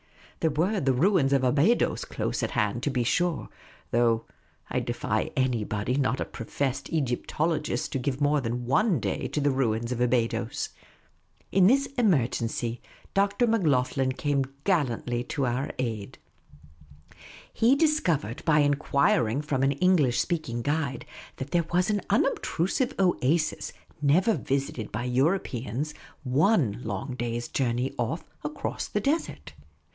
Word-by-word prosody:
There 160 - +2
were 175 +8 +1
the 135 -4 +2
ruins 145 -1 +3
of 135 -1 +3
Abydos 145 - +2
close - - -3
at - - -1
hand, 105 +3 0
to 145 - 0
be 125 -3 0
sure; 175 +6 0 0.4
though 115 -1 +2 0.5
I - - +1
defy - - -1
anybody 115 -3 0
not 130 -2 +1
a - - -1
professed 130 +3 -3
Egyptologist 150 0 -1
to 135 - -1
give 130 +1 -2
more 145 0 +2
than 120 0 -3
one 165 - +2
day - - -2
to - - -2
the 145 -1 +2
ruins 115 -3 0
of 120 -1 -2
Abydos. 115 -2 0 0.8
In 185 -1 +5
this 275 +5 +4
emer 175 - +4
gency. 115 0 -3 0.3
Dr. 200 +4 +2
Macloghlen 135 - +1
came 140 -2 +1 0.2
gallantly 125 - 0
to 140 -1 -1
our 125 +4 -1
aid. 110 -5 -4 1.4
He 240 +4 +4
dis 305 +1 +3
covered 145 - -1
by 150 -2 +4
enquiring 140 -3 +2
from 140 -3 -1
an 135 +1 +3
English 145 -5 +3
vSpeaking 155 -9 -3
guide 145 -3 -1 0.3
that 130 +2 -7
there 170 -2 +1
was 180 +3 +2
an 205 -1 0
unobtrusive 240 - 0
oasis, 170 -4 +1 0.3
never 175 +10 +4
visited 135 - -2
by 110 +3 -3
Europeans, 130 - -1 0.3
one 130 - +2
long 115 +5 -4
day's 120 -1 -3
journey 125 0 -1
off", 120 +8 -2 0.2
across 150 0 -4
the 210 - -1
desert. 295 +8 -2
140 Hz, 140 wpm, -27 LUFS, 120-170 Hz, 1.4 s, In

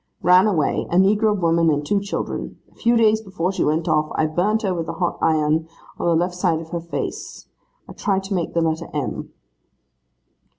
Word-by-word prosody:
'Ran 180 +4 +6
away, 165 -9 0
a - - -1
negro 205 +2 +3
woman 165 -1 +3
and 145 -1 0
two 200 +5 +1
children. 200 - -4
A - - -26
few 235 0 +2
days 220 -1 +3
before 185 -3 -2
she 195 - -1
went 155 +2 0
off, 155 0 +1
I 155 - +2
burnt 190 +8 0
her 190 -3 0
with 165 -2 -4
a - - -3
hot 175 -2 -2
iron, 155 0 +1 0.3
on - - -1
the 170 - +3
left 175 +2 0
side 180 -3 0
of 160 0 -10
her 170 -1 -3
face. 155 -5 -6 0.4
I - - -10
tried 195 -2 -1
to 195 +1 -4
make 175 -3 -2
the 170 - +2
letter 160 +1 -1
M. 145 -4 -3
175 Hz, 205 wpm, -21 LUFS, 160-195 Hz, 0.4 s, Ran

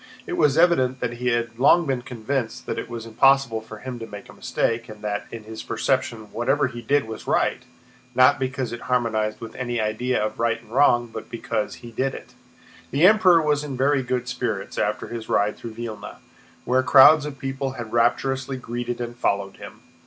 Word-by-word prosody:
It - - -5
was 145 0 +3
evident 130 -7 +3
that 120 -1 -3
he 125 - -2
had 120 -1 -1
long 165 +6 +5
been 135 -4 -1
convinced 120 0 -4
that - - -3
it - - -7
was 115 -1 -6
impossible 120 0 +3
for 110 0 -10
him 125 +2 -7
to 115 - -7
make 105 -1 -10
a - - -12
mistake, 115 0 -2
and 105 -1 -11
that 105 -1 -3
in 115 -1 -8
his 110 +1 -8
perception 115 -5 -2
whatever 130 +5 +1
he 120 -2 -5
did 145 +3 +1
was 110 - -8
right, - - +1 0.5
not 130 +2 +5
because 130 -2 -3
it 120 - -6
harmonized 110 -4 0
with 115 - -8
any 120 -2 -3
idea 110 +4 0
of 110 +1 -3
right 115 -1 +1
and 115 -1 -20
wrong, 120 -3 +4
but 110 - -7
because 110 -2 -3
he 120 - -9
did 130 +4 -1
it. - - -11 0.6
The 145 +6 +3
Emperor 185 -5 +6
was 150 -1 +1
in 140 -3 -5
very 135 +1 +2
good 125 -1 -2
spirits 120 -6 -3
after 105 +1 -1
his 115 -1 -7
ride 105 +1 +2
through 115 -2 -9
Vílna, 110 -3 -7 0.5
where 130 +1 +3
crowds 145 +3 +7
of 140 -2 -7
people 135 0 -3
had 120 -3 -7
rapturously 130 +3 +1
greeted 120 0 -4
and 120 0 -5
followed 100 -4 -1
him. - - -11
120 Hz, 200 wpm, -23 LUFS, 115-135 Hz, 0.6 s, crowds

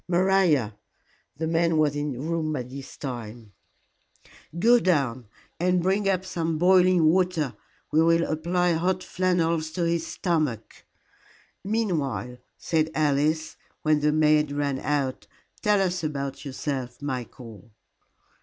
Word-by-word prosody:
"Maria" 175 - +2 0.6
the 160 - -2
maid 165 +1 +1
was 155 -2 +2
in 145 0 -2
the 125 - -8
room 160 +1 -2
by 130 -4 -2
this 130 +2 -10
time 115 -5 -7 1.1
"go 235 +7 +5
down 135 - 0 0.3
and 180 0 +1
bring 195 +2 +1
up 190 -1 0
some 165 -3 -2
boiling 180 0 +4
water. 170 -4 +1 0.4
We 155 - +4
will 165 +1 +4
apply 175 +3 0
hot 180 +3 0
flannels 170 -3 0
to 170 0 -1
his 170 0 -1
stomach." 155 - -2 0.8
"Meanwhile," 170 - -2 0.2
said 160 -2 0
Alice, 155 +1 0 0.3
when 155 -1 +3
the 150 0 +2
maid 150 -1 +3
ran 145 -2 -1
out, 140 -3 -2 0.3
"tell 210 -1 +3
us 180 -2 0
about 140 -2 -4
yourself, 130 -2 -4
Michael." 125 -4 -7
155 Hz, 125 wpm, -25 LUFS, 140-180 Hz, 1.1 s, go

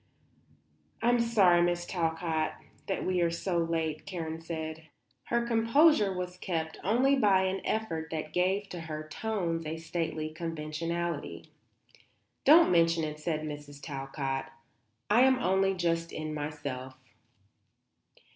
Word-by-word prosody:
"I 235 - +4
am 245 0 +4
sorry, 200 -7 +4
Mrs. 175 0 0
Talcott, 165 -2 -1 0.3
that 195 - -2
we 185 -1 +1
are 170 - +3
so 170 +1 -1
late," 165 -2 -1
Karen 165 -3 -4
said. 160 -1 -6 0.4
Her 235 0 0
composure 230 0 +4
was 180 -1 -4
kept 160 -4 -3
only 255 +7 +3
by 200 -7 +4
an 190 0 -1
effort 165 -8 -2
that 155 -1 -4
gave 190 +3 +1
to 180 - -6
her 155 -1 -6
tones 170 -3 -2
a 160 +1 -3
stately 160 -1 -3
conventionality. 165 0 -4 0.9
"Don't 320 - +7
mention 165 -1 +3
it," 150 0 -4
said 155 0 -2
Mrs. 145 -1 -7
Talcott. 135 -1 -4 0.7
"I'm 255 +4 +6
only 195 -3 +2
just 165 -2 0
in 155 0 -4
myself." 145 -4 -5
165 Hz, 125 wpm, -30 LUFS, 155-190 Hz, 0.9 s, Don't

